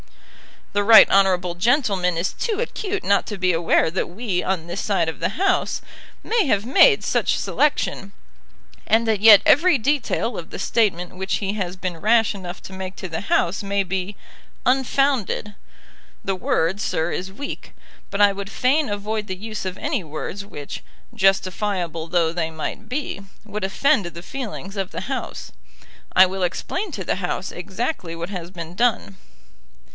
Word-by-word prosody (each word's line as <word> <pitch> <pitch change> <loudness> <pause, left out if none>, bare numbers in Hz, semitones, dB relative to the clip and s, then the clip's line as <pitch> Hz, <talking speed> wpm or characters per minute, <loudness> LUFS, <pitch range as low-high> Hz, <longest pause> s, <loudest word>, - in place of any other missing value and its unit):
"The 205 - +2
right 220 +1 +9
honourable 185 -2 +3
gentleman 195 - +1
is 170 +3 -1
too 435 -3 -2
acute 410 -4 -3
not 200 0 +2
to 210 - -5
be 185 -1 +2
aware 165 -1 +2
that 185 - -1
we 185 0 -2
on 185 -4 -2
this 175 +3 -4
side 180 -6 +1
of 160 - -7
the - - -2
House 380 +1 +1 0.4
may 455 -3 +1
have 205 -4 +1
made 415 - +5
such - - +1
selection, 200 -9 0 0.7
and 225 +1 +3
that 220 -2 +2
yet 210 -1 +9
every 340 +3 +5
detail 245 -3 0
of 165 - -9
the - - -7
statement 185 -5 0
which 190 +1 -1
he 200 -1 -2
has 185 -4 -3
been 185 -2 -4
rash 225 +4 +3
enough 185 -2 -8
to 190 - -9
make 190 0 -6
to 185 - -7
the 160 - -4
House 185 -2 +1
may 200 0 0
be 190 +2 -3 0.5
unfounded. 260 -4 +1 0.7
The 195 - -1
word, 180 +1 0
sir, 160 -4 -1
is 190 +1 -4
weak; 280 +7 -7 0.4
but 200 +1 -1
I 205 -1 +7
would 195 0 -6
fain 270 +6 +1
avoid 210 +1 -3
the 185 - -3
use 215 +1 -6
of 185 0 -4
any 285 - -2
words 165 +6 -6
which, 145 -8 -8 0.3
justifiable 190 -4 0
though 165 -1 +2
they 165 -1 -2
might 160 +7 -6
be, 265 -6 -3 0.2
would 210 -2 -4
offend 215 +3 +2
the 170 0 -8
feelings 210 -5 -6
of 190 -2 -2
the - - -5
House. 265 +6 -5 0.6
I 185 - +9
will 190 0 -3
explain 360 - -2
to - - -4
the - - -1
House - - -3
exactly 175 - -4
what 170 +2 -5
has 180 -4 -6
been 170 -2 -8
done." 200 - 0
195 Hz, 170 wpm, -22 LUFS, 180-225 Hz, 0.7 s, right